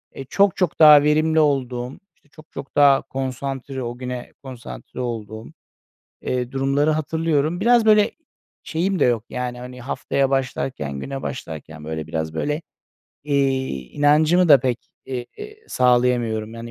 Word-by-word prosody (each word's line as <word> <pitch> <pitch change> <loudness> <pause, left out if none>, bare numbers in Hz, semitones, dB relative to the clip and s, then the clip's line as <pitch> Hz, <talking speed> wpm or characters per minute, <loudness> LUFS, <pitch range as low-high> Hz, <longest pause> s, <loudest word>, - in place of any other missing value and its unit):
eee, 135 - -7
çok 200 -2 +3
çok 180 -4 -1
daha 150 -2 +9
verimli 155 +1 +2
olduğum, 130 -4 0 0.2
işte, 145 - -33
çok 155 0 -17
çok 140 - -9
daha 140 -2 +5
konsantre, 135 0 -5
o 120 0 -5
güne 125 -1 -6
konsantre 120 - -9
olduğum, 110 -2 -5 0.8
eee, 125 -1 -2
durumları 135 +3 +1
hatırlıyorum. 155 +1 0
Biraz 235 +1 +4
böyle 210 -1 +5 0.5
şeyim 180 +3 -1
de - - +5
yok, 120 -2 +1
yani, 125 -1 -4
hani, 125 0 -9
haftaya 135 +2 -1
başlarken, 130 - -2
güne 135 - -6
başlarken 80 - -7
böyle 80 0 -5
biraz 80 -1 -4
böyle, 150 - -2 0.6
eee, 135 -2 +1 0.2
inancımı 155 +4 +3
da 140 -4 +8
pek, 125 -2 -1 0.3
eee, 125 -2 -4 0.4
sağlayamıyorum. 120 -3 +1
Yani, 115 0 -8
135 Hz, 140 wpm, -22 LUFS, 120-150 Hz, 0.8 s, daha